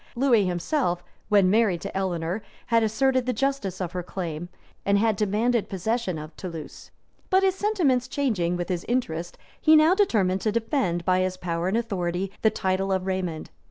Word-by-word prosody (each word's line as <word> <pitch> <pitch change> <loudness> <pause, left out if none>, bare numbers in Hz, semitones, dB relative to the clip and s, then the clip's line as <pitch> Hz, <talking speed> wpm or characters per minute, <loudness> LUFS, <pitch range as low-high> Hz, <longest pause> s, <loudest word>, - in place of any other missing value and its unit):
Lewis 235 -6 +3
himself, 175 - -1 0.3
when 200 -3 +5
married 210 -5 +3
to 200 - -6
Eleanor, 180 0 -1 0.2
had 230 -1 +3
asserted 255 +4 +1
the 250 - +1
justice 240 -7 -1
of 180 -3 -3
her 180 - -3
claim, 175 -2 -5 0.3
and 200 0 +3
had 220 0 +2
demanded 215 +3 +1
possession 195 -1 -1
of 155 +1 -9
Toulouse; 165 -4 -8 0.4
but 380 +1 +4
his 380 -1 +4
sentiments 355 - +1
changing 215 -11 0
with 175 -1 -4
his 180 -2 -2
interest, 175 -9 -2 0.2
he 315 - +6
now 310 +3 +6
determined 205 - +2
to 215 - +1
defend, 215 - -1
by 185 0 +3
his 185 0 -1
power 170 -1 -2
and 195 +4 +1
authority, 190 -4 -2
the 220 - +5
title 195 -2 -1
of 190 -1 0
Raymond. 185 -4 -3
195 Hz, 175 wpm, -25 LUFS, 180-240 Hz, 0.4 s, he